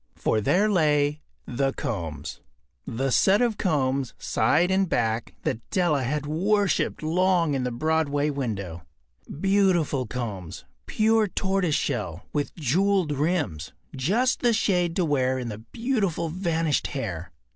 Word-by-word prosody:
For 110 - 0
there 190 - +3
lay 150 -6 +2 0.2
The 135 +2 -1
Combs—the 75 - -5
set 195 +10 +4
of 235 -4 +1
combs, 135 -6 0
side 180 +3 +2
and 190 -1 +2
back, 115 -1 -1
that 110 - -1
Della 170 -7 +1
had 145 +4 -2
worshipped 190 +4 +1
long 175 -1 +2
in 130 -2 -1
a - - -3
Broadway 150 +2 0
window. 100 - -4 0.5
Beautiful 175 - +1
combs, 105 -8 -6 0.2
pure 220 0 +2
tortoise 190 -4 0
shell, 100 - -2
with 145 -1 -2
jewelled 180 +3 +1
rims—just 145 - -1
the 240 -2 +3
shade 180 -6 +1
to 180 - +1
wear 130 -3 +1
in 125 -2 -4
the 105 -1 -6
beautiful 200 - -2
vanished 165 -3 0
hair. 95 - -5
150 Hz, 125 wpm, -25 LUFS, 125-185 Hz, 0.5 s, set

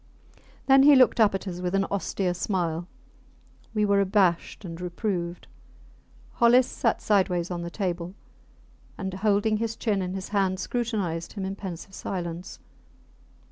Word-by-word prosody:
Then 270 0 +6
he 285 +1 +8
looked 255 -2 +5
up 210 -3 +5
at 195 - -5
us 180 -1 -5
with 180 +1 -1
an 195 0 +2
austere 190 -1 -1
smile. 175 -2 -2 0.9
We 210 -1 +2
were 200 -1 +3
abashed 190 -1 +1
and 165 0 -7
reproved. 175 -1 -3 0.9
Hollis 240 +2 +5
sat 230 -2 -1
sideways 185 -4 +1
on 175 -1 -3
the 170 - -4
table 180 -1 -3 0.8
and, 190 -1 -4
holding 205 +2 +1
his 225 0 -2
chin 210 -5 0
in 185 0 -3
his 190 0 -5
hand, 195 -2 +1
scrutinized 200 -7 -2
him 195 -3 -4
in 195 +1 -4
pensive 190 -1 -8
silence. 175 -2 -5
190 Hz, 145 wpm, -26 LUFS, 175-210 Hz, 0.9 s, he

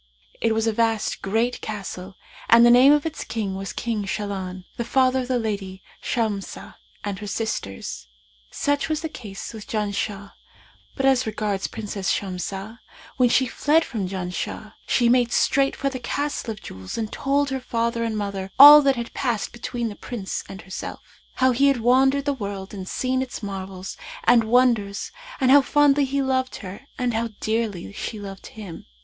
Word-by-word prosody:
It 225 -1 +2
was 225 0 +1
a 225 - +1
vast 225 -1 0
great 225 +5 0
castle 195 -3 -6 0.3
and 235 +1 +8
the 240 - +7
name 255 +3 +8
of 295 0 +3
its 315 -2 -4
king 210 -4 -3
was 195 0 -5
King 225 -3 -2
Shahlan, 190 -2 -4
the 235 - -2
father 260 +2 +2
of 250 - -3
the 255 -1 +1
lady 200 -4 -4 0.2
Shamsah 215 -5 -3 0.3
and 200 -1 -4
her 210 - -6
sisters. 100 - -4 0.4
Such 285 - -1
was 310 0 -1
the 320 - -3
case 210 -7 -8
with 220 -1 -9
Janshah; 205 -1 -3 0.6
but 270 - -1
as 260 -3 +3
regards 210 -2 -2
Princess 205 -4 -4
Shamsah, 195 +3 -4 0.4
when 250 -2 +4
she 260 +2 +4
fled 300 +6 +2
from 215 -7 -3
Janshah, 190 +3 -5
she 240 - +3
made 240 -1 +3
straight 275 -1 +2
for 275 - -2
the 260 - -5
Castle 285 +1 -3
of 215 -2 -6
Jewels 95 0 -7
and 220 -2 -3
told 280 +1 +1
her 265 - -1
father 235 -1 -1
and 225 -2 -2
mother 200 -2 -3
all 295 +2 +12
that 275 -1 +3
had 235 -1 -5
passed 240 -6 -1
between 240 0 -3
the 205 - -8
Prince 210 -5 -5
and 195 -2 -9
herself; 190 +1 -8
how 260 0 +3
he 275 +3 +3
had 275 -3 +3
wandered 265 +4 +3
the 285 - +1
world 200 -5 -6
and 190 -2 -6
seen 255 0 0
its 255 -3 -5
marvels 190 -1 -6 0.3
and 235 - +5
wonders 225 -4 +2 0.3
and 260 -2 +4
how 285 +1 +8
fondly 290 0 +3
he 275 +1 -1
loved 260 -1 0
her 200 +8 -9
and 250 -2 0
how 230 +1 -1
dearly 215 - -2
she 215 - -5
loved 195 -1 -8
him. 200 -6 -10
225 Hz, 180 wpm, -23 LUFS, 200-260 Hz, 0.6 s, all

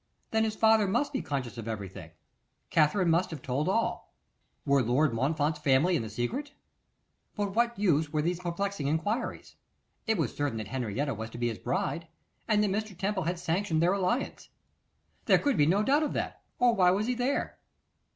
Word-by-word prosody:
Then 220 0 +2
his 215 -1 -2
father 220 -2 +4
must 280 +9 0
be 265 - -1
conscious 125 -4 -4
of 115 - -7
everything. 95 -6 -6 0.6
Katherine 165 +3 +3
must 170 +3 +2
have 155 -6 -8
told 140 +6 -1
all. 230 +4 -1 0.5
Were 140 -1 +4
Lord 125 +3 +2
Montfort's 145 +5 0
family 150 +5 +3
in 155 - +1
the 110 - -5
secret? 195 - -3 0.8
But 205 -2 -2
what 235 +1 +1
use 160 -7 +2
were 155 -2 0
these 175 +1 -1
perplexing 180 -2 -2
enquiries? 205 - -2 0.5
It 220 -1 +2
was 155 -8 -1
certain 145 -5 -1
that 110 -2 -5
Henrietta 130 +2 -2
was 110 +1 -6
to 115 - -10
be 120 0 0
his 110 - -6
bride, 165 +6 -2 0.4
and 210 -1 +3
that 205 - +1
Mr. 210 -2 -3
Temple 190 -1 -1
had 175 +2 -1
sanctioned 170 0 0
their 175 +3 +3
alliance. 200 +7 -1 0.8
There - - +6
could 285 -3 +1
be 145 - +4
no 195 +5 +3
doubt 285 +6 +3
of 305 - -1
that, - - -3 0.2
or 245 -1 +4
why 185 -5 +4
was 195 +4 +1
he 250 - 0
there? 250 +3 -1
170 Hz, 190 wpm, -29 LUFS, 140-210 Hz, 0.8 s, There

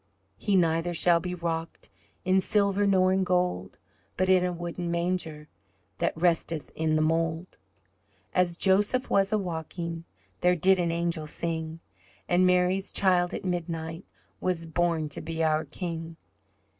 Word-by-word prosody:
"He 200 - +1
neither 170 -1 +2
shall 170 +1 +5
be 180 +1 -4
rocked 165 -1 -4 0.3
In 190 +1 +3
silver 200 0 +2
nor 185 -1 +4
in 190 0 +2
gold, 180 - -1 0.4
But 185 0 +1
in 185 -1 +5
a 180 - 0
wooden 175 0 -5
manger 170 -3 -2 0.5
That - - 0
resteth 165 -3 0
in 155 -1 0
the 155 - +2
mould." 165 +2 -1 0.7
As 175 -2 +1
Joseph 205 +8 +2
was 195 0 +3
a 215 - +3
walking 170 -2 -5 0.3
There 180 0 +3
did 185 +3 +3
an 170 -1 +1
angel 170 -2 -1
sing, 160 0 -4 0.5
And 180 +1 +4
Mary's 180 +2 +2
child 180 -2 +2
at - - -6
midnight 165 -1 -3 0.4
Was 175 -2 -1
born 165 -1 0
to - - -5
be 165 0 -3
our 155 0 +1
King. 165 +1 -6
175 Hz, 145 wpm, -27 LUFS, 165-185 Hz, 0.7 s, shall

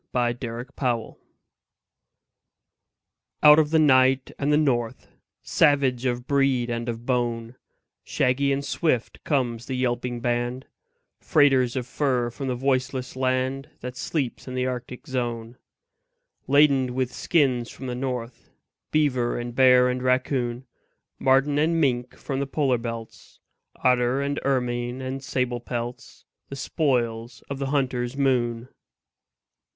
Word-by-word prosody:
THE 120 -1 +1
TRAIN 120 0 -5
DOGS 120 -4 -1 2.3
Out 150 +1 +9
of 150 -2 +2
the 160 - +3
night 130 -3 +4
and 145 +1 +1
the 150 - +4
north; 120 -7 -1 0.3
Savage 135 -5 +2
of 120 0 -2
breed 135 -4 +1
and 120 0 -3
of 115 0 -5
bone, 120 -2 -1 0.5
Shaggy 140 +2 +1
and 140 +1 -1
swift 140 -9 -1
comes 120 -5 -1
the 130 - -3
yelping 120 -1 -1
band, 120 +2 -2 0.5
Freighters 135 -6 +3
of 125 -2 -2
fur 125 -3 0
from 135 +3 -6
the 125 - -1
voiceless 130 0 -1
land 130 +2 -1
That 125 +1 -6
sleeps 130 0 -3
in 130 - -5
the 130 0 0
Arctic 125 -1 -5
zone. 120 -2 -4 0.9
Laden 135 -3 +4
with 130 -1 -1
skins 130 -8 +1
from 135 - -9
the 125 - -3
north, 125 -2 -5 0.4
Beaver 130 -6 +1
and 120 0 -5
bear 125 0 +6
and 125 0 -1
raccoon, 130 -1 0 0.5
Marten 135 +2 +3
and 165 +2 +2
mink 125 -4 0
from 135 -2 -4
the 140 - -2
polar 135 -4 +1
belts, 115 -1 -8 0.4
Otter 125 +1 +2
and 140 +1 -1
ermine 125 -2 -1
and 130 +1 -5
sable 125 -2 -1
pelts 120 0 -6 0.2
The 140 - -6
spoils 120 -5 -1
of 135 - -4
the 135 - -2
hunter's 130 -2 -1
moon. 120 -3 0
130 Hz, 135 wpm, -25 LUFS, 120-135 Hz, 2.3 s, Out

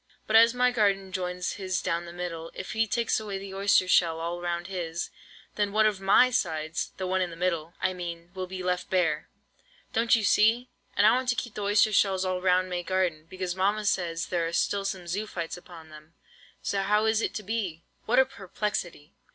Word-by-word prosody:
But 215 - 0
as 230 +2 +7
my 250 0 +3
garden 200 -4 +1
joins 180 -1 -3
his 185 -2 -1
down 170 +1 -2
the 170 - -9
middle, 170 -2 -5
if 185 - -6
he 220 0 +1
takes 230 +1 +1
away 205 -3 -4
the 195 0 -8
oyster 195 -1 +3
shells 165 -3 +3
all 170 +1 -3
round 175 0 -2
his, 175 -3 -4 0.5
then 205 -1 +1
one 215 0 +4
of 205 -3 +1
my 200 +6 +5
sides—the 165 -1 -2
one 185 +1 0
in 180 - 0
the 165 - -9
middle, 170 -2 -2
I 185 - 0
mean—will 175 +1 -6
be 185 0 -6
left 180 0 -1
bare, 165 -5 +1 0.6
don't 230 +2 +4
you 225 - 0
see? 225 +5 +3 0.3
and 205 - +5
I - - +8
want 255 0 0
to 245 - +2
keep 240 -3 -4
the 210 - -5
oyster 205 +1 +3
shells 190 -2 +3
all 185 -1 -1
round 185 0 +3
may 180 -1 -2
garden, 175 -3 -1
because 185 -1 -4
mamma 205 +3 +1
says 170 -4 0
there 170 -2 0
are 165 - -5
still 200 +3 0
some 190 -2 -3
zoophytes 180 -2 -4
upon 170 -2 -13
them. 155 +1 -15 0.5
So 195 - 0
how 210 +2 +2
is 220 0 +2
it - - -2
to 215 - -4
be?" 195 -6 -3 0.2
What 245 - +2
a 265 - +7
perplexity! 195 - -4
185 Hz, 210 wpm, -27 LUFS, 175-210 Hz, 0.6 s, I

